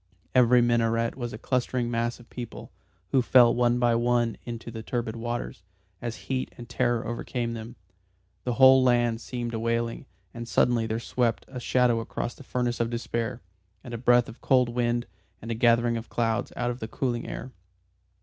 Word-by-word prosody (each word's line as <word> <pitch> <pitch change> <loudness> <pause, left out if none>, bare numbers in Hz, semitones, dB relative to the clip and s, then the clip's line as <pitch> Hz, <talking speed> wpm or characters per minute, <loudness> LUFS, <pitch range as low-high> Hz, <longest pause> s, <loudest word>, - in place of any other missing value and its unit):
Every 125 -1 +5
minaret 115 -1 +1
was 120 -3 -4
a - - -6
clustering 125 0 -1
mass 115 +1 -1
of 120 - -16
people, 120 -2 -8 0.4
who 135 - +4
fell 120 -1 +6
one 120 0 +2
by 120 -1 +3
one 120 -1 +1
into 115 -1 -6
the 110 -1 -6
turbid 115 0 -3
waters, 120 -3 -4 0.4
as 120 -1 -4
heat 130 -1 -2
and 120 - -9
terror 120 -1 0
overcame 120 0 -3
them. 115 +1 -7 0.7
The 125 -1 -1
whole 130 0 +8
land 120 -2 +2
seemed 120 0 -4
a 110 - -2
wailing, 115 +2 -1 0.3
and 115 0 -7
suddenly 115 0 +2
there 110 +1 -2
swept 115 -1 -1
a 130 - -7
shadow 125 -1 +2
across 115 +1 -4
that 140 - -14
furnace 125 -1 -1
of 115 0 +1
despair, 115 +1 -3 0.4
and 120 - -8
a 115 - -4
breath 120 0 +4
of - - -12
cold 125 -2 +3
wind, 120 0 0 0.3
and 115 +3 -6
a - - +1
gathering 115 0 +3
of 115 - -7
clouds, 115 0 -1
out 120 0 -1
of 120 - -7
the 110 - -5
cooling 120 0 -2
air. 130 - -6
120 Hz, 185 wpm, -27 LUFS, 115-125 Hz, 0.7 s, whole